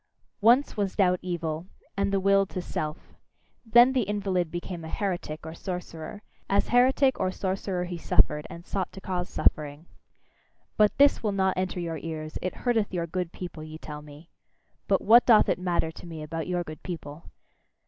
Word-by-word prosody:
Once 240 +6 +4
was 200 -3 -1
doubt 180 -3 +3
evil, 170 -2 -3 0.3
and 200 0 0
the 195 - +2
will 195 +1 +4
to 195 -1 -6
Self. 155 -3 -5 0.5
Then 240 +3 +6
the 260 - +2
invalid 195 -4 -1
became 175 0 -6
a - - -6
heretic 175 -5 -3
or 160 - -6
sorcerer; 180 +1 -6 0.3
as 200 +1 +2
heretic 260 +2 +4
or 185 - +1
sorcerer 185 -1 -2
he 175 -1 -5
suffered, 150 -1 +2
and 170 +1 -10
sought 190 -2 -3
to - - -8
cause 180 -1 -3
suffering. 150 +1 0 0.9
But 210 -1 +3
this 285 +1 +5
will 210 -3 0
not 190 -1 +1
enter 185 0 -2
your 165 -2 -3
ears; 155 -1 -5
it 185 - -3
hurteth 225 -4 +2
your 175 -3 -1
good 175 0 -3
people, 175 -3 -7
ye 155 0 -8
tell 150 -2 -8
me. 150 +3 -14 0.6
But - - +2
what 235 +3 +7
doth 225 -3 +7
it - - +1
matter 175 -3 0
to 175 - -12
me 160 -2 -7
about 160 +1 -4
your 180 -1 -1
good 155 -2 -9
people! 160 -3 -8
180 Hz, 180 wpm, -27 LUFS, 160-200 Hz, 0.9 s, what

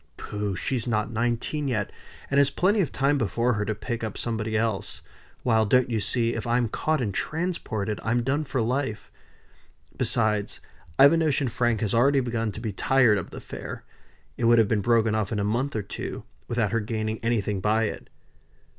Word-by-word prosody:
"Pooh! 105 -2 -3
she's 125 +4 -1
not 110 -1 0
nineteen 120 +6 -1
yet, 105 -6 -1 0.4
and 140 - +4
has 140 -1 +5
plenty 195 +9 +2
of 165 - -1
time 140 +2 +1
before 120 +2 +1
her 105 -1 -1
to 110 - -2
pick 115 +2 -4
up 110 -2 -4
somebody 110 -1 -2
else; 110 -3 -2 0.4
while, 110 -3 +3
don't 125 +3 +3
you 110 - +1
see, 115 +3 0
if - - -4
I'm 120 -1 +1
caught 155 +5 0
and 105 -5 -1
transported, 110 - -2
I'm 120 +2 +1
done 140 +5 0
for 130 -2 -1
life. 125 -1 -2 0.8
Besides 105 -3 0 0.4
I've 140 +3 +8
a - - +3
notion 145 -5 +1
Frank 120 -1 0
had 105 -3 0
already 135 +4 +4
begun 115 -3 -1
to - - -7
be 110 -3 -4
tired 120 -1 +3
of 90 - -7
the - - -10
affair; - - -7 0.5
it 120 - 0
would 120 0 +6
have 110 -2 +5
been 105 0 +1
broken 115 0 +3
off 110 -3 -1
in 110 - -1
a 100 - 0
month 120 +7 -1
or 110 - -1
two, - - -6 0.2
without 115 -4 0
her 115 - +1
gaining 110 0 -3
anything 105 -4 0
by 110 +3 +2
it." 105 - -4
115 Hz, 195 wpm, -26 LUFS, 110-130 Hz, 0.8 s, I've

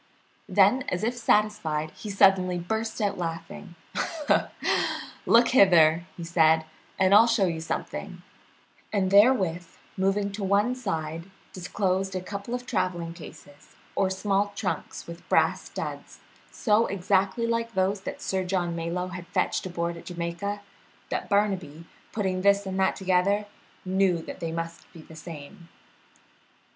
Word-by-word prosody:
Then, 205 +6 +4
as 180 +3 -2
if 235 +2 +1
satisfied, 210 -10 +1
he 215 - -9
suddenly 190 -2 +4
burst 220 +7 -3
out 205 -3 0
laughing. 170 +2 -6 1.5
"Look 235 +1 +6
hither," 170 -7 +5 0.2
said 160 -1 +4
he, - - -17 0.3
"and 190 0 +4
I'll 220 +3 +8
show 225 -4 +3
you 165 -3 -2
something," 160 - -5 0.7
and 190 -3 0
therewith, 195 -6 +4 0.3
moving 195 +1 0
to 200 0 -5
one 200 +5 +2
side, 165 -7 -4 0.2
disclosed 190 +1 -1
a 185 - -2
couple 200 +5 -5
of 245 0 -6
traveling 175 -6 -2
cases 145 -3 -14 0.2
or 190 - +2
small 200 +1 0
trunks 195 - -4
with 170 0 -11
brass - - +2
studs, - - -7 0.3
so 220 0 +2
exactly 195 +3 +1
like 230 0 -1
those 190 +1 +1
that - - -7
Sir 190 -1 -1
John 180 -2 -1
Malyoe 170 +2 -3
had 180 -1 -7
fetched 180 - -1
aboard 170 -1 -3
at - - -12
Jamaica 175 +4 -4 0.5
that - - -3
Barnaby, 185 -6 0 0.3
putting 190 -4 -1
this 200 +1 +3
and 190 0 -3
that 190 - +2
together, 190 +2 +1 0.4
knew 190 -1 +2
that - - -8
they 165 -1 -3
must 165 0 -6
be 165 -3 -12
the 160 - -14
same. 165 +2 -10
190 Hz, 140 wpm, -26 LUFS, 170-205 Hz, 1.5 s, I'll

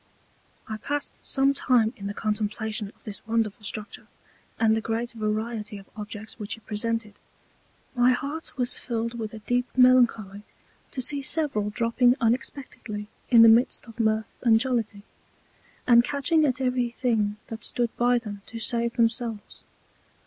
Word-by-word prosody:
I 220 - -4
passed 290 +5 -4
some 275 0 +2
Time 245 -4 +2
in 200 - -6
the 200 - -5
Contemplation 215 0 -2
of 200 - -18
this 205 -2 -8
wonderful 225 -1 -1
Structure, 210 0 -4 0.5
and 220 -1 +4
the 220 - -1
great 230 +2 -2
Variety 215 0 -3
of 195 - -12
Objects 210 0 -8
which 210 +1 -4
it 220 - -21
presented. 220 0 -2 0.7
My 245 0 +4
heart 285 +6 -4
was 245 -1 +2
filled 230 0 -3
with 215 -1 -4
a 225 - -8
deep 245 0 +1
Melancholy 240 -6 +4 0.5
to 255 - -4
see 285 +2 -1
several 270 -8 +1
dropping 235 +3 +2
unexpectedly 225 -3 -3 0.2
in 235 -2 +8
the - - +9
midst 230 +3 +4
of 230 0 -14
Mirth 220 -1 0
and 225 -2 +5
Jollity, 225 -5 -2 0.8
and 235 -1 +6
catching 290 +4 +2
at 255 -3 0
every 250 -2 0
thing 225 -4 0
that 225 -1 -8
stood 240 -2 -1
by 245 +1 +3
them 210 -4 -6
to 230 - -8
save 235 +1 0
themselves. 230 -2 -1
230 Hz, 155 wpm, -26 LUFS, 215-245 Hz, 0.8 s, the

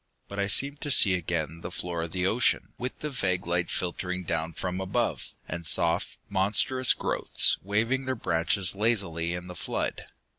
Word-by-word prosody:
But 100 - -6
I 100 - +1
seemed 140 +8 +2
to 145 - -3
see 100 -7 +5
again 85 -2 -2
the 85 - -5
floor 85 -1 -3
of 80 0 -4
the 90 +1 -1
ocean, 115 +6 +1
with 125 +1 -5
the 150 - -3
vague 90 -8 -1
light 85 0 0
filtering 90 +1 -2
down 80 -1 -2
from 90 +2 -3
above, 115 +5 -1 0.2
and 85 +1 -5
soft, 85 +1 +2
monstrous 105 +6 +3
growths - - +1
waving 115 +7 0
their 130 0 -1
branches 90 -2 +1
lazily 95 -6 0
in 90 0 -6
the 90 - -8
flood. - - -3
90 Hz, 175 wpm, -28 LUFS, 85-110 Hz, 0.2 s, see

